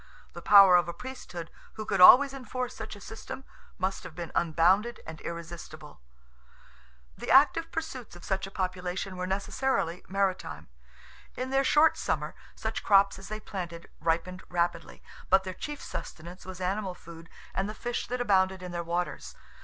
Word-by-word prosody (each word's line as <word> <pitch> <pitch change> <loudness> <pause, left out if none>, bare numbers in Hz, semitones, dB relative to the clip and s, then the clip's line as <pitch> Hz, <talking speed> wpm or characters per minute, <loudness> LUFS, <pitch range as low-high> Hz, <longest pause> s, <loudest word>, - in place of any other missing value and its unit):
The - - -8
power 195 -3 +8
of 175 -2 +1
a 170 - -5
Priesthood, 180 -10 -8 0.2
who 215 - -6
could - - 0
always 270 +8 +9
enforce 255 -1 -5
such 220 -1 -7
a - - -12
system, 225 +6 -8 0.3
must 190 +1 -2
have - - -10
been 170 -2 -6
unbounded 180 +8 +2
and 160 -1 -9
irresistible. 165 - -8 1.1
The - - -7
active 315 +5 +5
pursuits 265 - -5
of 175 - -13
such 195 0 -2
a - - -8
population 185 0 -3
were 180 0 -3
necessarily 190 -2 -1
maritime. 185 - -2 0.7
In 255 +1 -4
their 270 0 +3
short 300 +4 +4
summer, - - -2 0.2
such - - -4
crops 195 -1 +4
as 195 - -10
they 215 0 -5
planted 175 -5 -7
ripened 170 +3 -1
rapidly, 170 - -2 0.3
but 190 +1 +5
their 185 -1 -5
chief 295 +8 -7
sustenance 175 +4 -8
was 185 -1 -8
animal 190 0 -2
food 165 -1 -13 0.2
and 195 +2 -1
the 215 - -6
fish 240 +1 -3
that 250 +1 -3
abounded 190 -5 +2
in 180 - -6
their 175 0 -3
waters. 170 - -3
190 Hz, 165 wpm, -29 LUFS, 175-220 Hz, 1.1 s, always